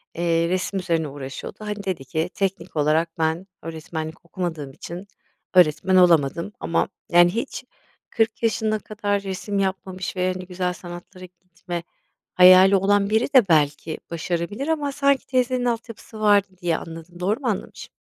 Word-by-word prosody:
Eee, 170 0 +1
resim 185 +2 -1
üzerine 165 -4 0
uğraşıyordu. 135 -1 -7
Hani, 210 -1 -5
dedi 185 -8 -3
ki 160 +6 -2
"Teknik 195 -3 -3
olarak 155 +2 +1
ben 160 +4 0
öğretmenlik 160 0 -6
okumadığım 165 -5 -4
için 175 +7 -9 0.5
öğretmen 180 +1 +4
olamadım 170 -1 +4
ama" 165 - 0 0.2
yani, 175 0 +6
hiç 245 +3 -4 0.5
40 225 0 0
yaşına 220 -1 +1
kadar 205 -2 -2
resim 200 +1 -3
yapmamış 190 -1 -3
ve, 185 0 0
hani, 185 0 -7
güzel 180 0 -2
sanatlara 180 +1 -10
gitme 175 -1 -8 0.5
hayali 185 +2 +8
olan 200 +1 +2
biri 220 +3 +2
de 245 -6 +7
belki 155 0 +2
başarabilir 175 - -3
ama 295 -3 0
sanki 280 0 +2
teyzenin 255 -1 0
altyapısı 230 -2 -4
vardı 205 -2 +4
diye 170 -2 +1
anladım. 165 +1 -10
Doğru 200 +5 0
mu 270 - -4
anlamışım? 210 -5 -4
185 Hz, 145 wpm, -23 LUFS, 165-205 Hz, 0.5 s, hayali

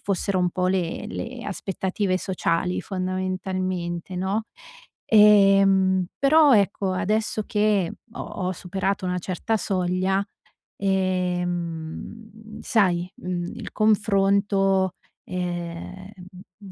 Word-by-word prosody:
fossero 195 -1 -1
un 180 -1 +1
po' 180 +1 0
le 185 +2 -1
le 240 0 -6
aspettative 190 0 -2
sociali, 180 -2 -1
fondamentalmente, 185 -1 -3
no, 195 +4 -1 0.7
ehm, 195 -3 +6
però, 290 0 +6
ecco, 200 -2 +1
adesso 215 +3 0
che 210 -4 +1 0.2
ho - - -7
ho 185 0 -3
superato 190 +2 -3
una 180 0 -1
certa 185 +5 -2
soglia, 185 +1 0 0.5
ehm, 185 +3 -3
sai, 180 -5 +1
mhmm, 180 -1 -4
il 235 -4 -7
confronto, 195 -2 +2 0.3
ehm, 180 +1 -5 0.5
mhmm, 200 -2 -12
190 Hz, 95 wpm, -24 LUFS, 180-200 Hz, 0.7 s, ehm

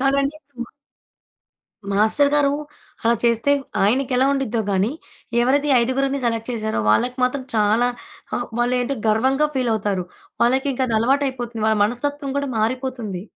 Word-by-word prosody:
కాదండి 275 +2 +1
ఇప్పుడు 280 -5 -16
మా - - -19 1.2
మాస్టర్ 220 +8 +4
గారు 285 -1 +3 0.5
అలా 230 +1 +3
చేస్తే, 235 +3 +2 0.3
ఆయనకి 255 +6 +1
ఎలా 260 - +3
ఉండిద్దో 245 -5 -1
గానీ, 200 +6 +1 0.5
ఎవరిది 285 +4 +2
ఈ - - +5
ఐదుగురిని 270 +3 0
సెలెక్ట్ 230 0 -1
చేసారో, 220 - -2
వాళ్ళకి 245 - +1
మాత్రం 260 +2 0
చాలా 215 +3 +3 0.5
ఆ! - - -1 0.2
వాళ్ళేంటో 250 +2 0
గర్వంగా 265 +7 +2
ఫీలవుతారు. 210 -7 0 0.4
వాళ్ళకి 265 +4 +2
ఇంకా 260 0 0
అది 225 -2 0
అలవాటయిపోతుంది. 245 -3 -1
వాళ్ళ 220 -1 +2
మనస్తత్వం 275 +5 -3
కూడా 280 -1 -2
మారిపోతుంది. 230 -5 -2
250 Hz, 140 wpm, -21 LUFS, 225-275 Hz, 1.2 s, ఈ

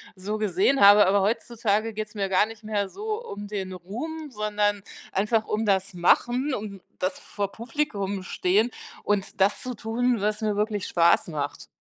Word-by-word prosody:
so 205 +3 -4
gesehen 205 +6 +2
habe, 205 0 +9
aber 195 +1 +3
heutzutage 225 0 0
geht 215 0 -4
es 210 - -19
mir 195 -1 -1
gar 190 +2 +3
nicht 225 0 -12
mehr 205 -2 -1
so 435 +3 -4
um 205 - -7
den 195 -2 -4
Ruhm, 285 - -6
sondern 210 -2 0 0.3
einfach 215 +3 +1
um 215 +1 -1
das 195 -1 +1
Machen 245 +10 +2
und 200 -3 -7 0.2
das 185 +1 -1
vor 200 -1 -4
Publikum 215 -6 -3
Stehen 195 +5 +1 0.3
und 205 -1 -1
das 200 +2 +3
zu 255 0 -4
tun, 230 +1 0
was 210 +1 0
mir 210 -2 0
wirklich 210 -1 -1
Spaß 170 0 +3
macht. 145 -2 -4
210 Hz, 175 wpm, -26 LUFS, 195-225 Hz, 0.3 s, habe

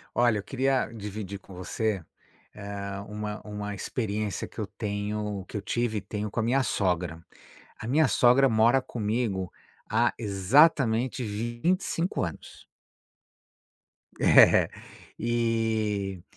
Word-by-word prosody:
Olha, 120 -3 +3
eu 100 - -6
queria 135 0 +1
dividir 105 -2 -6
com 95 - -15
você, 95 +1 -2 0.5
hã, 100 -1 -6
uma 105 0 -5
uma 105 -1 -5
experiência 105 -3 -3
que - - -21
eu 110 - -1
tenho 105 -1 -3
que - - -11
eu - - -4
tive 110 +1 -1
e - - -2
tenho 105 +1 -4
com - - -3
a - - +1
minha 130 +4 +2
sogra. 90 -7 -1 0.6
A 110 - -7
minha 150 +6 +4
sogra 125 +3 +5
mora 115 +3 +4
comigo 105 -5 -2 0.4
há 115 +2 +2
exatamente 115 - +3
25 120 - -1
anos. 85 -3 -7 1.5
É, - - +6 0.5
e 110 -4 0
110 Hz, 120 wpm, -27 LUFS, 100-120 Hz, 1.5 s, É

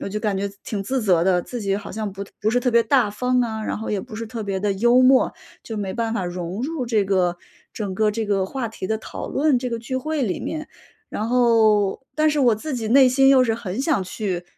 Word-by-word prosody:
我 - - -4
就 210 - -3
感 210 -3 -1
觉 200 +1 -2
挺 200 -3 -3
自 260 +5 -2
责 180 -5 +3
的， 185 -2 +3
自 245 -2 -6
己 195 -1 0
好 205 - -7
像 215 -2 -4
不 195 +1 -6 0.2
不 215 - +1
是 245 +2 +2
特 250 - +1
别 235 0 +4
大 245 -1 +3
方 250 +4 0
啊， 220 -3 -2
然 - - -3
后 220 - -5
也 210 - 0
不 215 - -10
是 230 +1 -5
特 225 0 -6
别 195 -2 -3
的 205 -1 +1
幽 240 +6 +4
默， 255 0 +5 0.3
就 225 - -6
没 190 -2 -3
办 230 -1 -1
法 225 - -1
融 175 +3 -5
入 295 -1 -2
这 225 -4 +1
个 180 -3 +1 0.3
整 200 -4 -4
个 215 +2 +2
这 220 +1 -3
个 195 -2 +1
话 245 +2 -4
题 220 -3 -6
的 220 +2 -1
讨 - - -7
论， 290 -3 +2
这 250 0 -4
个 230 - -2
聚 240 +3 -4
会 305 +2 -2
里 205 -7 -1
面。 310 -1 -5 0.4
然 220 +2 -3
后 225 -4 +3
但 310 0 +3
是 300 -1 +1
我 245 -4 +4
自 270 +7 -5
己 225 -3 -3
内 260 +2 +6
心 270 +2 +4
又 265 -2 +6
是 225 -2 0
很 220 -1 -4
想 275 - +1
去 185 -2 -4
220 Hz, 275 characters per minute, -22 LUFS, 200-250 Hz, 0.4 s, 内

